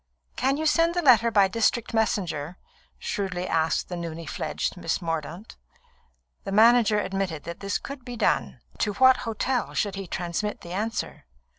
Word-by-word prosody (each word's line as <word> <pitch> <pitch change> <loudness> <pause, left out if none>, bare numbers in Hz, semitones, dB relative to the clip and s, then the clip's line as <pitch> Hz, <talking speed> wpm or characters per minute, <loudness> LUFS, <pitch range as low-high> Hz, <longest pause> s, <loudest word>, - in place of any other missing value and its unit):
"Can 270 +2 +1
you 315 - -2
send 330 +2 +3
the 350 - 0
letter 235 -4 +6
by 200 -3 +4
district 230 +3 0
messenger?" 180 -7 -1 0.4
shrewdly 185 -3 -3
asked 160 0 0
the 180 - -5
newly 165 -1 -6
fledged - - -3
Miss 175 -2 -2
Mordaunt. 165 +3 -5 0.9
The - - -5
manager 220 0 +5
admitted 190 -6 -3
that 170 0 -7
this 200 0 -1
could 275 -2 -9
be 245 -1 -7
done. 235 - 0 0.2
To 210 - 0
what 260 +5 +6
hotel 245 +3 -1
should 205 -2 0
he 195 -1 -6
transmit 175 +5 -3
the 170 - -8
answer? 215 - -3
205 Hz, 160 wpm, -26 LUFS, 175-235 Hz, 0.9 s, letter